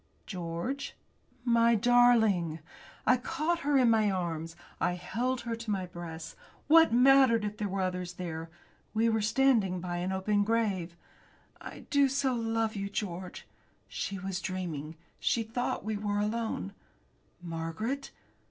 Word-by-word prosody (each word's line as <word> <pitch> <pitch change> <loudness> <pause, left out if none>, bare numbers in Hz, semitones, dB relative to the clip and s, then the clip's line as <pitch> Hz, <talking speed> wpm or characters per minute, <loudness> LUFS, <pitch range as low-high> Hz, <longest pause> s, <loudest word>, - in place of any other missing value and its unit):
"George!" 185 +10 -4 0.5
"My 235 -1 +4
darling!" 220 -8 +4 0.5
I 255 - +5
caught 320 +7 -1
her 290 -3 +2
in 250 -3 +5
my 215 -2 +3
arms. 165 -3 -3 0.2
I 175 - +1
held 240 +8 -2
her 235 -1 -3
to 230 -1 -8
my 195 -3 -1
breast. 170 -2 -8 0.3
What 325 0 +6
mattered 250 -2 +5
it - - 0
if 210 - -16
there 210 - -2
were 195 0 -2
others 180 -1 -3
there? 165 -2 -6 0.5
We 225 +1 +3
were 220 -1 +1
standing 215 -4 +2
by 175 0 -4
an 180 +2 -2
open 205 +2 +1
grave! 200 -6 0 0.7
"I - - -9
do 280 -1 +4
so 270 -1 +1
love 225 -1 -1
you, 200 0 -3
George!" 185 -3 -5 0.4
She 195 - -4
was 190 0 -4
dreaming. 165 -5 -4 0.2
She 230 - +1
thought 225 -1 -3
we 215 -1 -1
were 205 0 -1
alone. 210 - -2 0.7
"Margaret!" 175 +11 -4
210 Hz, 145 wpm, -30 LUFS, 180-235 Hz, 0.7 s, What